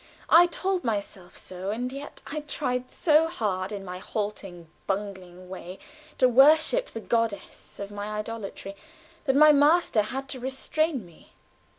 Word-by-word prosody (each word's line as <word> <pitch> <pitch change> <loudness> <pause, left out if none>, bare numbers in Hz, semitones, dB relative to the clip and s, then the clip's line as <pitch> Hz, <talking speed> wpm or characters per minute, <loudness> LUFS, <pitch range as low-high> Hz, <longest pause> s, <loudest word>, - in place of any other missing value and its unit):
I 345 +2 +8
told 370 +1 -2
myself 200 -5 -4
so, 185 +1 -6
and 245 +4 -3
yet 280 +1 -9
I 305 - -4
tried 255 -4 -3
so 315 0 +3
hard 200 - -2
in 200 -2 -6
my 180 0 -6
halting, 195 -5 -5 0.2
bungling 190 -2 -5
way 185 0 -8 0.4
to 255 - +5
worship 310 - +5
the 225 - -7
goddess 230 -2 -3
of 200 0 -6
my 205 +1 -5
idolatry, 210 -2 -6 0.5
that 270 -2 +2
my 305 +1 +8
master 295 -4 +4
had 265 +6 -5
to 260 - -4
restrain 265 - -1
me. 170 -2 -19
230 Hz, 150 wpm, -26 LUFS, 195-290 Hz, 0.5 s, I